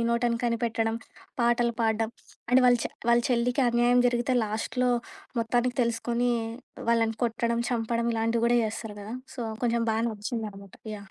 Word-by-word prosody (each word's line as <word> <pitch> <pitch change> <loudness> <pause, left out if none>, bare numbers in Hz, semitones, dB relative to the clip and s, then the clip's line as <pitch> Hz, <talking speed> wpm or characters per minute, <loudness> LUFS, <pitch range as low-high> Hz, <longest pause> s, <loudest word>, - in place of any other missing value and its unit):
నోటని 235 0 +1
కనిపెట్టడం. 230 -1 0 0.5
పాటలు 235 0 +2
పాడం. 220 0 +1 0.4
అండ్ 255 +1 +6
వాళ్ళ 245 -1 +5
చె - - -3 0.2
వాళ్ళ 235 0 +5
చెల్లికి 245 +3 +2
అన్యాయం 240 +1 +4
జరిగితే, 240 +1 0
లాస్ట్‌లో 235 +4 -1 0.5
మొత్తానికి 240 +2 0
తెలుసుకొని, 235 +1 0 0.6
వాళ్ళని 225 -1 +2
కొట్టడం, 235 0 0
చంపడం 235 0 0
ఇలాంటివి 230 +1 +1
కూడా 240 0 +4
చేస్తారు 220 -1 -5
కదా! 215 +4 -6 0.2
సో, - - -5 0.2
కొంచెం 235 -1 +1
బాగా 225 - 0
నచ్చిందనమాట. 210 -2 -6 0.2
యాహ్! 200 -1 -13
235 Hz, 140 wpm, -27 LUFS, 225-240 Hz, 0.6 s, అండ్